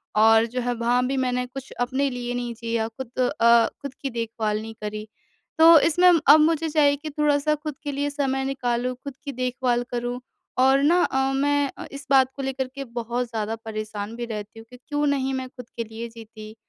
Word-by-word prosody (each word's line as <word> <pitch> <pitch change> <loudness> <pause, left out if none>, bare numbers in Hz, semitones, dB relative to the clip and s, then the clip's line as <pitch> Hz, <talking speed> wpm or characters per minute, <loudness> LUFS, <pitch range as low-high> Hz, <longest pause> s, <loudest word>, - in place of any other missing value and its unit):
और 225 +1 +6
जो 250 +2 -4
है 245 0 -1
वहाँ 240 +2 +1
भी 270 0 -1
मैंने 250 -1 0
कुछ 265 +1 -9
अपने 265 +3 0
लिए 245 -1 -4
नहीं 245 -1 -3
जिया, 230 -1 -1
खुद 235 +2 -9
अ, 235 -2 +4
खुद 280 -2 -6
की 275 - -2
देखभाल 225 -2 -2
नहीं 225 0 -8
करी। 215 0 -5 0.5
तो 325 0 +9
इसमें 355 +4 +4 0.2
अब 295 +2 +9
मुझे 320 +1 +2
चाहिए 290 -2 +3
कि 305 +2 -7
थोड़ा-सा 300 0 +1
खुद 300 -1 -6
के 290 - -3
लिए 285 +1 -1
समय 270 -2 -1
निकालूँ, 250 -2 -1
खुद 280 -2 -6
की 280 - -4
देखभाल 250 -1 -1
करूँ 245 +1 -3 0.4
और 265 +1 +5
ना 340 +5 +4
अ, 265 - -1 0.2
मैं 285 0 +1
अ, - - -7
इस 280 0 -9
बात 265 -1 +6
को 275 - -5
लेकर 265 -1 -2
के 275 - -4
बहुत 240 +1 -3
ज़्यादा 220 -1 -3
परेशान 215 0 -5
भी 240 0 -4
रहती 215 -1 -7
हूँ 225 - -12
कि 250 - -13
क्यों 295 -1 0
नहीं 270 -1 0
मैं 260 -1 -3
खुद 250 -2 -12
के 230 - -1
लिए 225 +1 -7
जीती? 220 -1 -12
250 Hz, 210 wpm, -24 LUFS, 230-280 Hz, 0.5 s, तो